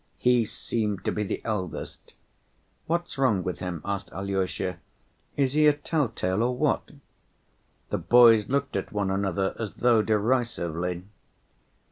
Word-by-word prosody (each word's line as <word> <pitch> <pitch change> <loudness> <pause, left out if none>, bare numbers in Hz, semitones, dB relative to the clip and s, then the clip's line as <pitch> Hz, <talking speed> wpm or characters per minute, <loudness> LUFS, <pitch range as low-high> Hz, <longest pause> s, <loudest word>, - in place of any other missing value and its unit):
He 125 -2 +3
seemed 105 -1 -3
to - - +1
be 105 - -2
the 105 - -3
eldest. 95 -6 -5 0.7
"What's 170 -3 -2
wrong 110 -9 +2
with 90 - -4
him?" 90 -3 -5
asked 100 -1 -3
Alyosha, 95 -2 -2 0.6
"is 135 -2 +2
he 150 0 +5
a 150 - +6
tell‐tale 115 - -1
or 125 +1 0
what?" 150 0 0 1.0
The - - 0
boys 115 -3 +6
looked 140 +1 -1
at 95 - -3
one 100 -2 -1
another 95 -1 -1
as 110 -4 -4
though 120 -2 +4
derisively. 100 -7 -1
105 Hz, 135 wpm, -26 LUFS, 95-125 Hz, 1.0 s, a